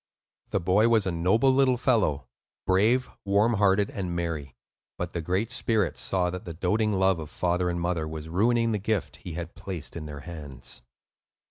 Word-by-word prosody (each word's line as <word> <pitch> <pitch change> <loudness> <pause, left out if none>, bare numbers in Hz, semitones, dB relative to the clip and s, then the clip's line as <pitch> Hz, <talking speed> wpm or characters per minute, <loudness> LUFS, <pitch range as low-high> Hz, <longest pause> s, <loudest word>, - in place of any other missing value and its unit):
The - - 0
boy 95 +6 +3
was 110 -3 +3
a 95 - 0
noble 95 +10 +3
little 130 -2 +3
fellow; 110 - +1 0.4
brave, 110 +7 +3 0.2
warm 100 +4 +3
hearted, 100 -1 +3
and 90 -3 -3
merry. 80 -6 -3 0.4
But 90 -1 -4
the 85 - -2
Great 95 +7 -1
Spirit 110 -5 +1
saw 90 -2 0
that 90 0 -6
the 85 -2 -7
doating 105 +5 +1
love 95 -2 +3
of 75 -2 -7
father 90 +2 0
and 85 0 -2
mother 85 -2 -1
was 80 0 -6
ruining 115 +7 +2
the 105 - 0
gift 105 0 -2
He 85 - -8
had 85 0 -6
placed 90 -2 -7
in 80 -2 -6
their 70 -1 -7
hands. 70 -6 -8
90 Hz, 185 wpm, -27 LUFS, 85-105 Hz, 0.4 s, boy